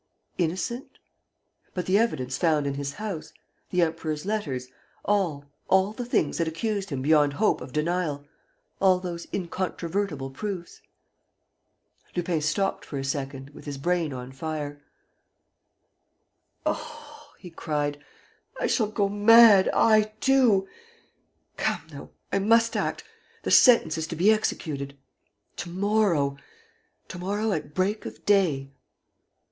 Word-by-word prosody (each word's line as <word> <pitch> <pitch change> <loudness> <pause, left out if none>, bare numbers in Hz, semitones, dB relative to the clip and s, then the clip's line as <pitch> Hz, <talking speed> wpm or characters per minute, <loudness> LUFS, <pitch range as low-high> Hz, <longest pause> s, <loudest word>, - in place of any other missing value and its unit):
Innocent? 185 +9 -2 0.8
But 180 -2 -2
the 190 +3 +3
evidence 130 - 0
found 155 -4 +2
in 140 - -1
his 140 0 -4
house, 200 -3 -5 0.4
the 180 -1 +2
Emperor's 160 -1 -2
letters, 150 -12 -2 0.4
all, 175 -9 0 0.2
all 190 +2 +3
the 245 +2 -5
things 160 -11 0
that 165 - +1
accused 195 +4 -2
him 135 -4 -3
beyond 150 -1 +4
hope 210 +8 +1
of 125 0 -8
denial, 150 -2 -1 0.5
all 190 -1 +5
those 175 -2 -6
incontrovertible 175 -5 -3
proofs? 185 +3 -6 1.3
Lupin 175 -2 0
stopped 195 +6 0
for 145 - -6
a 135 - -3
second, 135 0 -4
with - - -13
his 145 -2 -5
brain 170 +1 0
on 125 0 -7
fire: 145 0 -5 1.8
"Oh," - - -6
he 180 - -11
cried, 145 -3 -3 0.6
"I - - 0
shall 220 -4 +2
go 205 -1 0
mad, 205 0 +7
I, 215 -1 +3
too! 245 -8 +4 0.9
Come, - - 0
though, - - -10 0.2
I 195 - +3
must 230 +3 +3
act... - - -2 0.4
the - - -2
sentence 200 - +6
is 160 - -3
to 170 - -5
be 185 +7 +5
executed... 140 -9 -2 0.6
to - - -5
morrow... 185 -7 +1 0.7
to 185 - -7
morrow 205 +4 -1
at 150 -4 -4
break 200 +4 0
of - - -11
day." 160 -10 +2
175 Hz, 130 wpm, -26 LUFS, 145-205 Hz, 1.8 s, mad